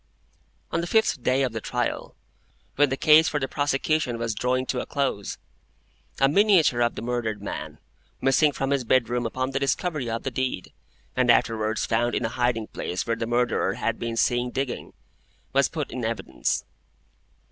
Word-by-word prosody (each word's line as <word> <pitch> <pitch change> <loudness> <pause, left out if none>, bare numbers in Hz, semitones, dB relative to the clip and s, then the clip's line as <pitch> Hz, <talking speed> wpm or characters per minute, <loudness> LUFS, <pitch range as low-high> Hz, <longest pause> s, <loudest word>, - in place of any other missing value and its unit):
On 165 - 0
the 170 - -4
fifth 220 - +2
day 130 +3 +2
of 130 - 0
the 110 0 -4
trial, - - -3 0.6
when 145 0 +4
the 135 - -1
case 155 +3 +6
for 150 - -1
the 135 - -1
prosecution 145 -2 0
was 115 -1 -2
drawing 125 +4 0
to 125 - -2
a - - -6
close, 135 -8 -2 0.8
a 135 - +5
miniature 170 - +4
of 120 0 +2
the - - -6
murdered 115 -3 -2
man, 100 - -6 0.4
missing 140 +3 +4
from 135 0 -2
his 140 -2 +1
bedroom 120 0 +1
upon 130 +3 -2
the 135 - -1
discovery 140 -1 -1
of 115 0 -3
the 135 - -2
deed, 130 -7 -3 0.4
and 125 -1 +2
afterwards 110 -2 +2
found 120 +1 +1
in - - 0
a - - -1
hiding 120 -2 0
place 90 -3 -4
where 115 - 0
the 115 0 -3
Murderer 120 +1 +1
had - - -2
been 115 -1 -3
seen 120 +1 +2
digging, 135 0 -4 0.6
was 140 0 +3
put 155 -4 -4
in 125 0 -4
evidence. 115 0 -2
125 Hz, 180 wpm, -25 LUFS, 115-140 Hz, 0.8 s, case